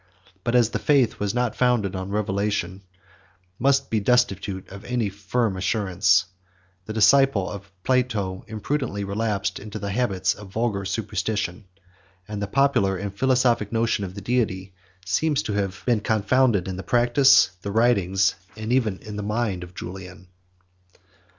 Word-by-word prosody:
But 120 +1 0
as 120 -2 +4
the - - -2
faith, 135 -6 +2
which 105 - -1
is 100 - -2
not 125 -2 0
founded 120 -6 +1
on 95 +1 -4
revelation, 100 -2 -1 0.8
must 135 +2 +3
remain 110 -2 +1
destitute 100 -5 +1
of 100 +2 -10
any 120 -4 -1
firm 105 +2 -1
assurance, 95 -1 +2 0.6
the - - -4
disciple 110 -1 +4
of 100 -1 -8
Plato 110 -8 0
imprudently 110 -1 -3
relapsed 100 -1 -2
into 105 +1 -7
the 100 -1 -4
habits 100 -5 0
of 105 - -11
vulgar 110 -3 -1
superstition; 105 -1 -3 0.6
and 105 -1 -5
the 100 - -2
popular 120 -6 +2
and 100 +1 -5
philosophic 125 -3 +2
notion 115 -2 0
of 95 -1 -6
the 100 - -7
Deity 95 -5 -1 0.3
seems 145 - +1
to 105 - -3
have 100 -2 -2
been 120 -3 +2
confounded 110 -1 +2
in 95 -1 -4
the - - -4
practice, 120 -1 +4
the 100 - -5
writings, 100 -4 +2 0.2
and 110 +2 -2
even 110 -7 +1
in 105 -1 -7
the - - -3
mind 105 -3 -2
of 90 0 -12
Julian. 95 0 -9
105 Hz, 155 wpm, -24 LUFS, 95-120 Hz, 0.8 s, as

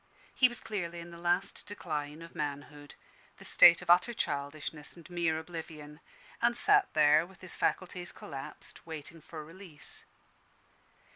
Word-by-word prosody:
He 255 - +6
was 240 - -7
clearly 175 -5 -4
in 170 0 -9
the 170 - -11
last 175 +3 0
decline 150 -5 -5
of 165 - -12
manhood, 145 0 -6 0.4
the - - -10
stage 170 +1 +8
of 175 - -12
utter 180 +7 +4
childishness 150 -1 -3
and 170 - -13
mere 170 -2 +1
oblivion; 160 -2 -8 0.4
and - - +3
sat 410 -2 +4
there 150 0 +6
with 190 +2 -15
his 185 - -9
faculties 180 -1 -2
collapsed, 135 -3 -9
waiting 160 0 -8
for 155 -1 -9
release. 165 -2 -1
165 Hz, 145 wpm, -31 LUFS, 150-175 Hz, 0.4 s, stage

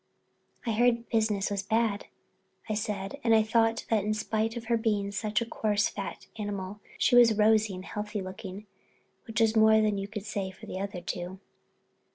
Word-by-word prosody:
"I 230 - 0
heard 235 +1 +2
business 215 -3 +1
was 200 -1 -1
bad," 220 0 0 0.6
I 215 - -1
said, 210 +2 -3
and 225 -2 +4
thought 225 0 +2
that 215 -3 +3
in 215 +1 0
spite 220 +2 -1
of 230 - -6
her 235 +1 +2
being 210 -3 0
such 215 +2 -1
a - - -1
coarse, 210 -2 0
fat 200 - -6
animal, 205 -1 -4 0.2
she 245 - +3
was 235 -3 +7
rosy 215 -2 +4
and 185 +1 -8
healthy 210 0 -4
looking, 190 +1 -7 0.6
which 225 +1 -2
was 225 -1 +3
more 220 0 +6
than 210 -2 +1
you 195 - -4
could 210 -1 -6
say 205 -3 -3
for 190 - -12
the 185 - -5
other 195 -2 -4
two. 180 +1 -5
215 Hz, 185 wpm, -29 LUFS, 200-225 Hz, 0.6 s, was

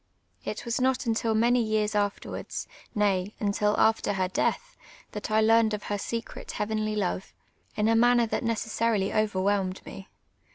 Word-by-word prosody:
It - - -5
was 235 +2 -1
not 260 0 +1
until 225 -1 +1
many 240 +2 +3
years 215 -1 0
afterwards, 205 -1 -3 0.3
nay, 200 -1 +1
until 210 0 +1
after 220 -2 +3
her 185 -1 0
death, - - -1 0.4
that 210 +1 -5
I 215 0 +3
learned 220 0 +4
of 210 - -8
her 205 0 -3
secret 230 +3 -5
heavenly 215 0 -1
love, 190 -2 -2 0.4
in 210 0 +1
a 225 - +4
manner 240 +1 +5
tliat 220 - -2
necessarily 225 -3 0
overwhelmed 195 -2 0
me. 195 - -9
215 Hz, 155 wpm, -27 LUFS, 205-230 Hz, 0.4 s, manner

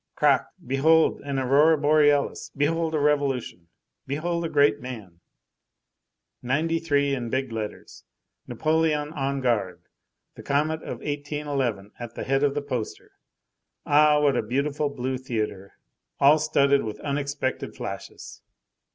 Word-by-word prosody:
Crac, - - +3
and - - -21
behold 160 +5 +3
an 140 -1 -3
aurora 140 +5 +4
borealis, 145 -1 +2
behold 160 +2 0
a - - +1
revolution, 140 -11 0 0.4
behold 170 +5 -2
a 165 - -2
great 145 -7 +3
man; 110 -9 -9 1.2
'93 145 +1 0
in 120 -3 -3
big 130 0 -2
letters, 110 -2 -7 0.4
Napoleon 155 -1 0
on 140 -2 -2
guard, 100 -8 -1 0.5
the - - -11
comet 155 +3 0
of - - -7
1811 145 -8 -3
at 120 -1 -8
the - - -4
head 135 +1 +1
of 145 -1 +1
the 145 - -2
poster. 125 -6 -5 0.7
Ah! 150 0 +5
what 145 -3 +3
a - - +2
beautiful 140 +6 -1
blue 130 -2 -3
theatre 110 -6 -4 0.5
all 145 +3 +6
studded 140 -2 +3
with 110 -1 -6
unexpected 140 -2 -3
flashes! 100 -6 -8
140 Hz, 130 wpm, -25 LUFS, 125-150 Hz, 1.2 s, all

